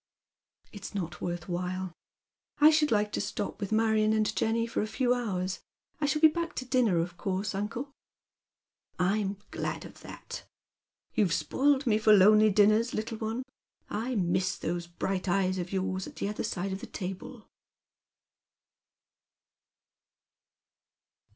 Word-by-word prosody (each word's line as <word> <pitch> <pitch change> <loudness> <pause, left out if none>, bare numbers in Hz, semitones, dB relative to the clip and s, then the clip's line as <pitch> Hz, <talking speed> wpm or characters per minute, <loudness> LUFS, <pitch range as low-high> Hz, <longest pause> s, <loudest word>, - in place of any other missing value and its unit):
" - - -38
It's 205 0 -8
not 170 -5 -4
worth 175 -1 -4
while. 180 0 -3 0.7
I 300 +1 +8
should 305 -1 +3
like 210 -2 +2
to - - -1
stop 205 +1 -4
with 200 - -3
Marion 220 -1 +3
and 215 0 +1
Jenny 230 +1 +1
for 230 - -2
a 215 - -1
few 245 +2 +1
hours. 185 -7 -2 0.4
I 295 - +1
shall 305 +1 0
be - - +12
back 335 +2 -3
to 255 - -4
dinner, 250 -8 +2
of 170 +1 -2
course, 195 +2 -2
uncle." 225 +8 -4 0.6
*' - - -47
I'm 200 -1 -1
glad - - -3
of - - -12
that. - - -9 0.7
You've 205 -7 +2
spoiled 280 +6 +2
me 215 -3 +3
for 215 0 +6
lonely 210 +2 +7
dinners, 215 +3 +4
little 220 +1 -3
one. 225 +3 -2 0.5
I 240 +4 -2
miss 185 -1 +1
those 170 +1 -3
bright 185 +2 -2
eyes 185 0 +1
of 175 0 -4
yours 190 -1 -2
at - - -11
the 200 - -2
other 210 - -3
side 190 +1 -2
of 190 - -5
the - - -7
table.' 195 +5 -7
210 Hz, 150 wpm, -29 LUFS, 185-230 Hz, 0.7 s, be